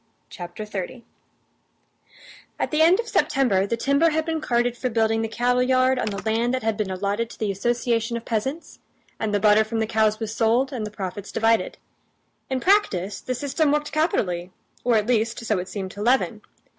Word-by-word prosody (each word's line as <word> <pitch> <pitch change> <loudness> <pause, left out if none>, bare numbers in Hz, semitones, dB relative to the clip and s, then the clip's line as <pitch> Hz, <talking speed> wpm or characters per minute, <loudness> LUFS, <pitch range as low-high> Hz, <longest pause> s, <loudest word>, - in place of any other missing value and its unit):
Chapter 175 +3 -7
30 210 +3 -6 1.5
At - - -2
the 305 0 +2
end 345 +5 +6
of 470 - -2
September 240 - +2
the 230 - -1
timber 280 +7 +3
had 315 0 -1
been 320 -1 -2
carted 240 -2 +1
for 255 +1 -2
building 225 -1 +1
the 225 - -1
cattleyard 250 +2 +2
on - - -1
the 200 -2 -3
land 230 +3 +1
that 255 - -4
had 220 -1 0
been 210 -2 -2
allotted 200 +4 -2
to - - -12
the 215 -2 -1
association 235 +2 0
of 230 - -9
peasants, 265 +8 -3 0.4
and 220 - -1
the 205 - +1
butter 210 +1 +5
from 220 +1 -4
the 220 - +1
cows 215 -1 +1
was 220 -1 -4
sold 240 +5 +2
and 220 -4 -3
the - - -6
profits 200 -1 -6
divided. 225 0 +1 0.7
In 260 -1 -1
practice 210 - +1
the 255 - -3
system 285 +3 0
worked 295 0 0
capitally, 180 - 0 0.3
or, 240 -1 +3
at 210 -1 +2
least, 230 0 0
so 210 -4 +1
it 180 - -5
seemed 190 -2 -5
to 200 - -8
Levin. 235 -2 +1
230 Hz, 195 wpm, -24 LUFS, 210-255 Hz, 1.5 s, end